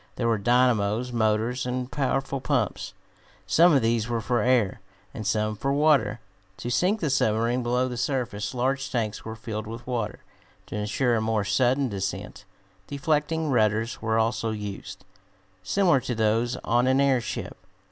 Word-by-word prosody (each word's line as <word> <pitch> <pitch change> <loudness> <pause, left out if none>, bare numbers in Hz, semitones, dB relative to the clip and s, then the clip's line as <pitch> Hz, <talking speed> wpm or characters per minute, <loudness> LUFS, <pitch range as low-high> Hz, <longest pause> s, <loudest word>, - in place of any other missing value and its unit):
There 115 - -1
were 115 -2 +2
dynamos, 120 0 +2
motors 115 +2 +1
and 125 0 -3
powerful 135 -1 -1
pumps. - - -1 0.5
Some 175 +2 +5
of 135 -6 +3
these 115 0 +1
were 120 -1 0
for 120 0 0
air, 115 -4 +2 0.3
and 110 -3 -5
some 110 -1 0
for 135 +6 -2
water. 140 -7 +3 0.4
To 120 - -4
sink 190 - +1
the 155 -4 0
submarine 115 0 +1
below 125 +1 +1
the 125 -1 -5
surface 120 -5 -2
large 135 +2 -1
tanks 110 -4 -2
were 110 0 -6
filled 110 -1 -5
with 115 +2 -8
water. 115 -4 -3 0.4
To - - -7
insure 115 +4 0
a - - 0
more 110 -1 0
sudden 125 +7 +2
descent, 100 -4 -5 0.4
deflecting 150 +2 0
rudders 110 0 +1
were 110 0 0
also 115 0 0
used, 105 -2 -6 0.6
similar 175 - +3
to 125 -1 -4
those 115 +2 +1
on 120 +2 +2
an 130 +1 +3
airship. 135 -4 0
120 Hz, 155 wpm, -26 LUFS, 110-130 Hz, 0.6 s, Some